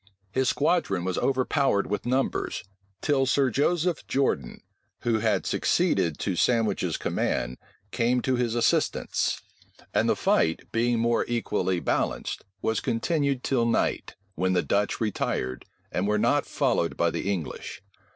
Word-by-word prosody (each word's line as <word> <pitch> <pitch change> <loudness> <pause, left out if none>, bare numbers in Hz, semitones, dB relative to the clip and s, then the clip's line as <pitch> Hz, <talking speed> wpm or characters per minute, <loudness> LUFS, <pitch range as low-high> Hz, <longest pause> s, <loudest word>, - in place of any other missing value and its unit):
His 130 +2 +1
squadron 145 - +1
was 95 -1 -1
overpowered 135 -4 +1
with 105 +3 -3
numbers, 130 +2 -1 0.4
till 135 -3 +2
Sir 130 0 +3
Joseph 165 +6 0
Jordan, 130 - -1 0.4
who 115 -2 +1
had - - +1
succeeded 80 -3 +1
to 95 - -2
Sandwich's 115 +4 +1
command, - - -1 0.3
came 125 +1 +2
to 130 - +1
his 120 -2 0
assistance; 120 -1 +1 0.5
and - - +2
the - - +3
fight, 80 0 +2
being 120 +1 +1
more 115 +1 +2
equally 100 -6 0
balanced, - - -1 0.2
was 110 -1 +1
continued 140 +2 0
till 120 -4 +1
night, 115 - 0 0.2
when 95 0 0
the 90 - +2
Dutch 100 0 0
retired, 65 - -2 0.3
and 95 +3 0
were 105 0 +2
not - - +2
followed - - 0
by - - +2
the 100 - -2
English. 90 0 -5
115 Hz, 140 wpm, -26 LUFS, 100-130 Hz, 0.5 s, Sir